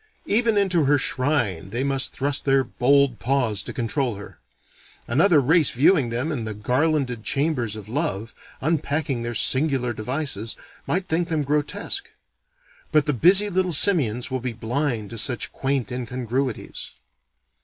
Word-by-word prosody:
Even 225 0 +1
into 185 -6 +2
her 145 +1 +3
shrine 125 - -1
they 120 +6 -2
must 135 -1 0
thrust 140 +1 -2
their 135 -1 +2
bold 135 0 +1
paws 125 -6 0
to - - -7
control 120 0 -2
her. 100 - -12 0.7
Another 155 +6 +4
race 150 +3 +4
viewing 140 0 +3
them 125 +7 -2
in 130 -7 -3
the 110 -1 -5
garlanded 125 +1 -1
chambers 135 -7 -1
of 105 -2 -10
love, 115 -5 -3 0.3
unpacking 145 -4 -1
their 120 0 -4
singular 130 -3 +2
devices, 115 -1 -4 0.3
might 185 +1 -1
think 170 +1 0
them 155 -2 0
grotesque: 145 +1 -2 0.8
but 150 -2 +3
the 150 - 0
busy 190 - +6
little 185 -2 -1
simians 140 - +3
will 130 -1 -2
be 125 -1 -4
blind 115 -1 -3
to 115 - -4
such 125 +2 -1
quaint 135 -2 -2
incongruities. 125 0 -4
135 Hz, 145 wpm, -23 LUFS, 120-155 Hz, 0.8 s, busy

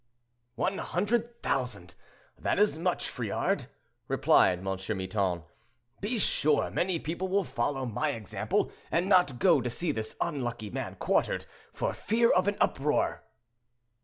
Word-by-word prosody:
"One 195 +1 -1
hundred 235 +5 -1
thousand! 125 -9 -2 0.4
that - - -1
is 210 -3 +4
much, 175 +3 -1
Friard," - - -1 0.4
replied 90 - +4
M. 90 - -10 0.3
Miton. 95 -3 -1 0.6
"Be 220 +4 -1
sure 150 -7 +2
many 180 -1 0
people 170 +4 -3
will 195 +1 +2
follow 130 0 -2
my 120 0 -1
example, 110 -4 -1 0.2
and 175 +3 +1
not 180 -10 +4
go 165 -1 +4
to 125 - -2
see 160 +7 -1
this 110 -5 -4
unlucky 120 -9 -2
man - - -4
quartered, - - 0 0.3
for - - -2
fear 230 +2 +2
of 185 +1 +3
an 205 - +1
uproar." 150 +2 +1
150 Hz, 135 wpm, -29 LUFS, 120-190 Hz, 0.6 s, is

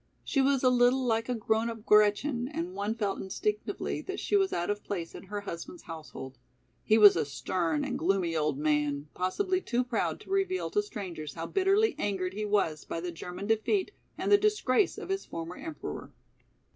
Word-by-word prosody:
She 275 - +1
was 270 -1 +2
a 255 - +5
little 250 +1 +4
like 225 0 0
a 250 - +1
grown 220 +1 +1
up 225 -1 -8
Gretchen, 220 +5 +3
and 180 - -4
one 205 +3 -2
felt 205 -4 -1
instinctively 420 - -2
that - - -5
she - - 0
was 390 -1 +3
out 175 +3 0
of 205 0 -4
place 170 -5 -4
in - - -10
her 205 +2 -4
husband's 205 - -7
household. 150 -5 -9 0.4
He 215 - +4
was 210 -2 +9
a 165 - +2
stern 155 +3 -1
and - - -3
gloomy 175 -1 +1
old 150 -3 +1
man, 150 -1 0
possibly 370 - 0
too 245 -5 0
proud 245 -2 -1
to - - -12
reveal 385 -1 0
to 415 - +2
strangers 180 - -7
how 165 - -4
bitterly 390 - +3
angered 190 -2 -1
he 210 +2 -3
was 195 -7 +1
by - - -4
the 175 +1 -4
German 180 +3 -7
defeat 225 - +1 0.3
and - - -1
the 405 - +8
disgrace 410 -6 +2
of - - -7
his 390 0 -1
former 165 +1 -6
emperor. 320 -1 -7
210 Hz, 195 wpm, -30 LUFS, 170-275 Hz, 0.4 s, was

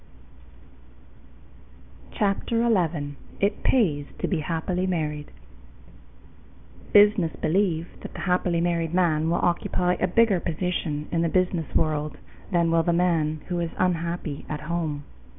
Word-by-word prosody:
Dickinson_ - - -13
CHAPTER 215 +3 +1
ELEVEN 165 -10 0 0.2
It 200 +2 0
Pays 155 - +2
to - - -2
be 180 - 0
Happily 175 +3 -1
Married 150 -4 -2 1.6
Business 205 -5 +5
believe 170 -2 +1
that - - -9
the - - -6
happily 180 -2 +1
married 170 -1 0
man 160 -3 +2
will 170 - +2
occupy 180 +1 +1
a 185 - +2
bigger 205 0 +3
position 165 -3 -2
in 165 - +1
the 170 - +1
business 180 -3 0
world 155 -1 0 0.3
than 170 -2 +2
will 165 0 +4
the 170 - +1
man 165 -3 +1
who 175 -1 -1
is 170 -1 -1
unhappy 170 -4 -1
at 150 -1 -4
home. 155 -2 -3
170 Hz, 135 wpm, -25 LUFS, 155-180 Hz, 1.6 s, Business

